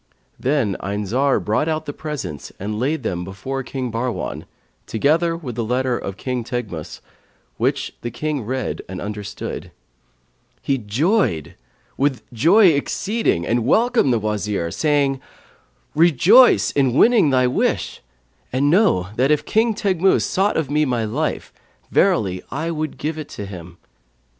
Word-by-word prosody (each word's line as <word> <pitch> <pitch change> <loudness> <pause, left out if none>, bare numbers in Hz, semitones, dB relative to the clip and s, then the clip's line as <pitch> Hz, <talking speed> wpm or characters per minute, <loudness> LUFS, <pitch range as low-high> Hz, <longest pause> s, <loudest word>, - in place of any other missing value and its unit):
Then 130 -8 0
Ayn 100 +1 -3
Zar 130 +7 +2
brought 110 +9 0
out 155 -1 -1
the 145 - -5
presents 145 - -6
and 105 +2 -4
laid 140 +3 -1
them 90 -5 -2
before 100 +9 -5
King 130 -1 -4
Bahrwan, 115 -2 -3 0.4
together 165 +8 +1
with 135 -8 -6
the 115 +1 -2
letter 125 +2 0
of 100 -4 -5
King 125 0 -3
Teghmus, 110 -10 -5 0.6
which - - 0
when - - -36
the 120 - -3
King 145 +4 -3
read 130 +3 -3
and 95 -1 -6
understood, 105 0 -6 0.9
he 135 -1 0
joyed 115 - 0 0.4
with 135 -2 0
joy 180 - +6
exceeding 170 - 0
and 120 0 +1
welcomed 230 - +3
the 120 - +3
Wazir, 105 -5 -2
saying, 140 - +1 0.7
'Rejoice 175 - +5
in 135 -4 +2
winning 215 - +5
thy 130 -1 +3
wish; 125 - -1 0.5
and 140 +3 +2
know 170 - +3
that 130 +3 +3
if 150 -1 +2
King 220 0 +2
Teghmus 190 -2 +2
sought 195 +2 +1
of 150 -4 -1
me 150 +1 +3
my 120 -5 0
life, 145 +9 -3 0.4
verily 95 -4 +2
I 160 +4 -3
would 155 -2 -4
give 155 +1 -3
it 150 - -7
to 105 - -7
him.' 90 -3 -10
130 Hz, 150 wpm, -21 LUFS, 110-155 Hz, 0.9 s, joy